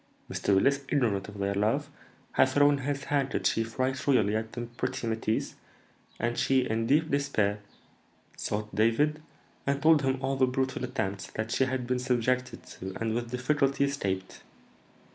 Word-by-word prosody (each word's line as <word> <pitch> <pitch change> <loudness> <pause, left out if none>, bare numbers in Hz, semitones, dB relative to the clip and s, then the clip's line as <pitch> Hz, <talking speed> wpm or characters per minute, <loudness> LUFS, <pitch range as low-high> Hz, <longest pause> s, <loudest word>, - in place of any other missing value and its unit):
Mr. 100 - +1
Willis, 140 +8 +3
ignorant 110 -9 +1
of 105 0 -10
their 100 0 0
love, 105 +3 +1 0.4
had 130 - +4
thrown 145 +1 +4
his 140 +1 -2
handkerchief 135 -5 0
right 130 +1 +1
royally 115 -6 +3
at 110 0 -2
the 120 - -4
pretty 120 +1 -4
métisse, 110 -1 -1 0.7
and 120 +1 -1
she, 135 -1 +3
in 115 +1 -1
deep 155 +3 +3
despair, 110 -8 +1 0.8
sought 105 0 -3
David, 130 +9 +2 0.5
and 140 0 +1
told 155 0 +5
him 135 -1 0
all 135 0 -1
the 130 -1 +4
brutal 130 0 -1
attempts 100 -6 -3
that 110 +1 -3
she 130 +2 +2
had 130 -1 -2
been 125 +1 0
subjected 125 0 0
to 95 0 -8
and 115 -1 -1
with 120 0 -2
difficulty 135 +2 +1
escaped. 100 -10 -2
125 Hz, 160 wpm, -29 LUFS, 110-135 Hz, 0.8 s, told